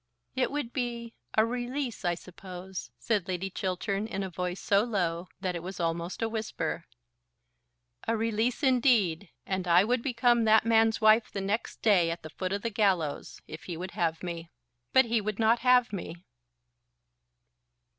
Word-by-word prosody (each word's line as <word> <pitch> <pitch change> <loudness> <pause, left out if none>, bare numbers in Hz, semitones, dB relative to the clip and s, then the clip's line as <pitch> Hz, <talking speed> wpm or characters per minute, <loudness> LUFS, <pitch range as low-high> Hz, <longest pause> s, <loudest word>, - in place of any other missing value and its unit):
"It 260 -1 +1
would 285 -5 -3
be 235 -3 -3 0.2
a 220 - +6
release, 245 +1 -3
I 175 -1 +1
suppose," 180 +1 -8
said 210 -6 -1
Lady 190 +1 -3
Chiltern 195 +3 -2
in 195 -3 -3
a 190 - -5
voice 180 +1 -3
so 200 +1 +3
low, 180 -6 -1
that 185 -2 -1
it 170 - -4
was 185 +2 -7
almost 170 +3 -2
a - - +2
whisper. 220 -1 -3 1.2
"A 230 0 +1
release 225 +4 0
indeed; 230 - +3 0.2
and 190 -1 -2
I 175 +2 +6
would 245 +3 +1
become 240 -2 +2
that 220 +1 +5
man's 225 0 +3
wife 220 +1 +5
the 200 - -3
next 200 +4 -3
day, 185 -6 +4
at 165 +1 -4
the 155 - -8
foot 185 -1 -4
of 200 +1 -2
the 230 - -1
gallows; 190 -8 0
if 155 0 -9
he 175 -3 -5
would 185 +2 -5
have 165 -1 -1
me. 170 -2 -5 0.4
But 260 -1 +6
he 230 -1 +1
would 210 0 -3
not 230 +1 +3
have 250 -2 +4
me." 180 -3 -5
205 Hz, 170 wpm, -29 LUFS, 180-230 Hz, 1.2 s, a